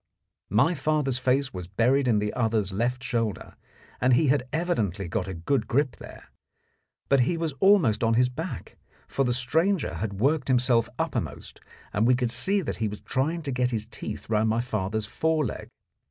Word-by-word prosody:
My 115 - +3
father's 145 -4 0
face 130 +1 +1
was 90 -2 -6
buried 125 +8 +2
in 115 -3 +3
the 105 0 -1
other's 110 -4 0
left 125 +5 -1
shoulder, 115 -7 -2 0.5
and 125 0 +4
he 145 +3 +3
had 135 -2 +1
evidently 110 - -1
got 90 +2 -2
a 95 - -5
good 85 +12 -1
grip 135 -1 0
there; - - -12 0.8
but 140 - +4
he 150 +8 +2
was 165 -3 -2
almost 175 - +4
on 115 0 +3
his 125 +2 +4
back, 160 +7 -6 0.3
for 135 - 0
the 125 - +1
stranger 155 +9 +1
had 110 -2 -3
worked 140 +4 +1
himself 125 -3 +2
uppermost, - - -4 0.3
and 110 +3 +2
we 125 - +5
could 125 -2 0
see 190 +12 +1
that - - -4
he 110 - -1
was 105 0 -7
trying 160 +6 -1
to 140 - -3
get 125 -1 +1
his 110 -3 -2
teeth 110 -1 -6
round 110 0 +1
my 110 +1 +1
father's 110 -3 -2
fore 160 +7 0
leg. - - -5
125 Hz, 185 wpm, -26 LUFS, 110-140 Hz, 0.8 s, we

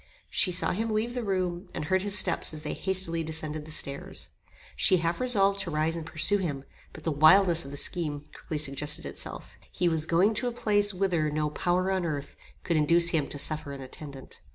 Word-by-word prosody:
She 185 - +2
saw 180 - +2
him 225 +5 -1
leave 220 +2 -1
the 245 -1 -3
room, 185 -3 -2
and - - -3
heard 190 +3 +1
his 205 +1 +1
steps 160 - +2
as 155 - -8
they 150 - -3
hastily 185 -4 0
descended 155 -1 -4
the 155 - -11
stairs. 140 -2 -2 0.5
She 185 - +4
half 170 0 -1
resolved 200 -6 +3
to 190 - -3
rise 155 +1 0
and 165 -1 -6
pursue 195 +6 +3
him, 145 -7 -3 0.3
but 155 - -12
the 160 - 0
wildness 165 +3 +5
of - - -8
the 140 - -6
scheme 150 -3 -1
quickly 155 - -5
suggested 150 0 -1
itself. - - -8 0.2
He 180 - 0
was 160 -2 +1
going 185 +6 +3
to 235 +3 0
a - - -1
place 205 -3 +2
whither 180 -5 0
no 150 0 -1
power 180 +4 0
on 190 -1 0
earth 145 -4 -4 0.3
could 170 -3 +1
induce 170 +3 +4
him 160 -4 +1
to - - -3
suffer 150 0 -2
an 135 - -8
attendant. 135 +1 -9
170 Hz, 210 wpm, -28 LUFS, 150-190 Hz, 0.5 s, wildness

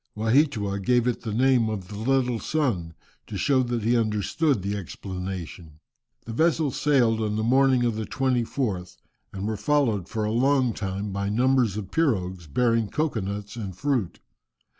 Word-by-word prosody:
Waheatua 110 -3 +2
gave 120 +2 +3
it 125 - -1
the 110 - -4
name 125 0 +3
of 100 -4 -4
the 105 - -8
"little 125 +1 +1
sun," 105 - -1 0.3
to - - -5
show 135 -2 +3
that 120 -3 -2
he 120 +3 +2
understood 110 - +1
the 100 +1 -2
explanation. 90 -4 -7 0.5
The 115 - -6
vessels 160 +1 +1
sailed 120 -6 +3
on 105 -1 -1
the 110 - -1
morning 130 +1 +3
of 115 -2 0
the 110 -1 -4
24th, 120 -7 -1 0.3
and 100 +1 -4
were 110 -1 -2
followed 110 - +1
for 110 -1 -2
a 105 - -1
long 130 +1 +2
time 100 0 -4
by 100 +1 -2
numbers 120 -1 +2
of 100 -3 -6
pirogues 95 - 0
bearing 115 - +1
cocoa 150 -8 -1
nuts 100 +2 -5
and 100 -6 -6
fruit. 125 -7 -1
110 Hz, 165 wpm, -25 LUFS, 100-130 Hz, 0.5 s, gave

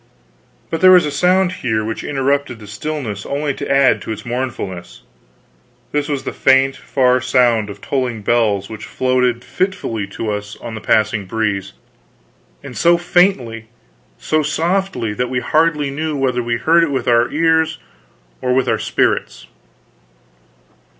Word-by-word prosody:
But 165 - -2
there 185 - +8
was 180 -3 +7
a 150 - -2
sound 180 +4 +2
here 110 -11 -2
which 110 0 -4
interrupted 140 -2 -1
the 110 - -12
stillness 105 -1 -5
only 145 0 -2
to - - -6
add 135 -1 +4
to - - -6
its 110 0 -6
mournfulness; 120 -8 -5 0.9
this 145 0 -1
was 140 -2 -2
the - - -4
faint 135 0 +3
far 130 -1 +1
sound 120 -4 +2
of 100 0 -9
tolling 125 -6 -2
bells 105 -4 +1
which 110 -1 -9
floated 125 -2 0
fitfully 150 - -2
to 105 +2 -4
us 105 0 -5
on 115 - -8
the 110 - -6
passing 110 -2 +1
breeze, 100 -2 -2 0.9
and - - -9
so 170 0 +4
faintly, 170 - +1 0.5
so 155 0 0
softly, 170 - -1
that 125 +4 -2
we 125 - -1
hardly 150 +1 +1
knew 155 +1 -3
whether 130 -2 0
we 120 0 -1
heard 160 +8 +3
it 165 - 0
with 130 -3 -2
our 120 0 +3
ears 160 0 +1 0.6
or 125 0 +1
with 130 - +1
our - - +1
spirits. - - -1
130 Hz, 155 wpm, -18 LUFS, 110-150 Hz, 0.9 s, there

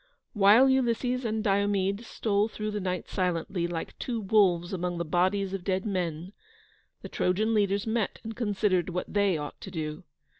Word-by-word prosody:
While 210 +5 +6
Ulysses 250 -1 +1
and 220 -1 -1
Diomede 200 0 +1
stole 210 -2 0
through 215 -1 -4
the 210 - -2
night 185 -2 -3
silently, 175 -1 -1
like 170 -1 -6
two 235 -3 -2
wolves 190 -4 +2
among 180 -1 -2
the 170 - -2
bodies 185 +4 +1
of 195 -2 -4
dead 190 +1 -1
men, 180 -2 -3 0.7
the - - -5
Trojan 215 +5 +1
leaders 200 -2 +1
met 220 -2 -1
and 225 0 -6
considered 200 -6 0
what 180 0 -4
they 200 -4 +2
ought 150 -1 -7
to - - -7
do. 155 -1 -5
195 Hz, 165 wpm, -28 LUFS, 180-215 Hz, 0.7 s, While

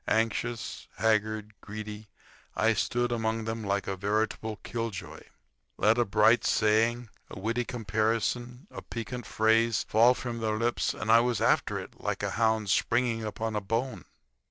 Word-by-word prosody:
Anxious, 115 -1 -1
haggard, 110 0 +1
greedy, 105 0 -7 0.5
I 115 +1 +3
stood 120 +2 0
among 110 -1 -1
them 115 0 -3
like 100 0 -1
a 95 - -2
veritable 110 +2 -1
killjoy. 115 -5 -5 0.6
Let 110 +4 +3
a 120 - +3
bright 105 +3 +4
saying, 115 +2 +2 0.2
a - - -9
witty 115 +4 -1
comparison, 115 - -1
a - - -7
piquant 120 0 -6
phrase 115 0 +2
fall 120 +4 +5
from 120 -2 -5
their 110 -1 -1
lips 120 +2 0
and 110 - -1
I 115 - +8
was 120 -1 +1
after - - +2
it - - -9
like - - -2
a - - -1
hound 110 -2 +1
springing 115 +1 +1
upon 110 +1 -3
a 105 - 0
bone. 115 +6 -2
110 Hz, 155 wpm, -29 LUFS, 110-115 Hz, 0.6 s, I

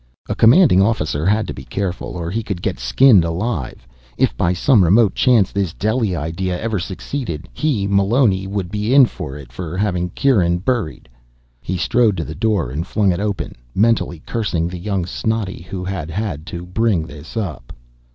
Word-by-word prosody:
A - - -1
commanding 120 - +6
officer 80 -7 0
had 105 +2 +2
to - - -5
be 65 - -9
careful, 95 +3 -4
or 85 -1 -4
he 115 +4 -1
could 100 -5 -5
get - - -2
skinned 95 - +5
alive. 85 - -3 0.3
If, - - +2
by 85 - +1
some 100 +4 +4
remote 100 +4 +4
chance, 120 -7 +3
this 95 -4 -2
Delhi 110 -2 0
idea 90 +4 -3
ever 110 -3 -2
succeeded, 90 - -5
he, 135 -11 0
Meloni, 100 0 +2
would 95 -3 -3
be 105 +5 0
in 140 -2 +8
for 65 - -7
it 70 - -12
for 90 -1 -5
having 90 -3 0
Kieran 90 -8 +2
buried. 100 -3 -2 0.5
He 90 +6 -3
strode 105 +4 +2
to - - -2
the - - -6
door 105 - 0
and 80 +6 -4
flung 100 -2 +2
it 85 - -2
open, 100 -1 -3 0.2
mentally 105 -6 +1
cursing 95 -8 -1
the 90 0 -6
young 95 -1 -2
snotty 105 0 -3
who 95 -2 -4
had 90 -5 -4
had 85 -4 -4
to 85 0 -6
bring 95 -2 0
this 75 +6 -10
up. 85 - -4
95 Hz, 180 wpm, -19 LUFS, 85-110 Hz, 0.5 s, in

